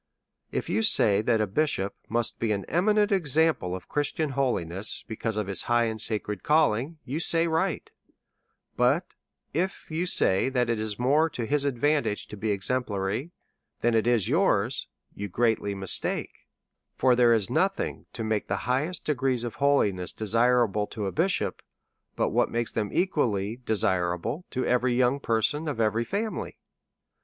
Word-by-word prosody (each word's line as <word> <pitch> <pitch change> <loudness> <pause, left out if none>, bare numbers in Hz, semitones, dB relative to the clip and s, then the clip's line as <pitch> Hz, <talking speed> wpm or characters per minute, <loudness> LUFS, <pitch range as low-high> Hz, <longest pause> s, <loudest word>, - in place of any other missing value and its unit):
If - - -2
you - - +1
say 105 - +4
that 110 0 +2
a - - +2
bisliop 100 -3 0 0.2
must 120 0 -1
be 115 -2 0
an 100 -2 -1
eminent 210 +4 +2
example 160 - +1
of 95 - -9
Christian 145 +1 -1
holiness, 105 -8 -2
because 110 -1 -3
of 105 - 0
his 95 -1 -4
high 120 0 +4
and 110 -1 -2
sacred 105 -2 -2
calling, 150 -1 +2
you 140 +6 -3
say 165 0 +1
right; 165 +2 0 0.9
but 130 +8 +1 0.4
if 180 +2 -2
you 170 +3 -1
say 95 - +2
that 125 -3 +1
it 115 - -1
is 110 -1 -3
more 145 +6 +3
to 120 -6 -4
his 145 +4 0
advantage 140 -3 +1
to - - -7
be 110 +2 -3
exemplary 105 - -1 0.5
than 120 0 +2
it 115 0 +2
is 120 -5 +2
yours, 130 - +1 0.3
you 100 - -5
greatly 110 -1 0
mistake; 95 -1 -2 0.5
for 125 -1 +4
there 120 -1 +5
is 115 -1 +1
nothing 195 +8 -1
to 115 - -4
make 110 -1 -1
the - - -3
highest 140 +8 -1
degrees 130 -4 0
of 120 - -5
holiness 105 - +2
desirable 115 -1 +2
to 105 -2 -5
a 95 - -2
bishop, 180 +4 0 0.5
but - - +1
what - - +2
makes 120 -1 -1
them 105 -2 -2
equally 120 - 0
desirable 90 - 0
to 130 - -2
every 125 0 +2
young 125 +2 +2
person 130 +6 0
of 145 -6 -3
every 110 +1 +2
family. 210 - -3
120 Hz, 160 wpm, -27 LUFS, 105-150 Hz, 0.9 s, there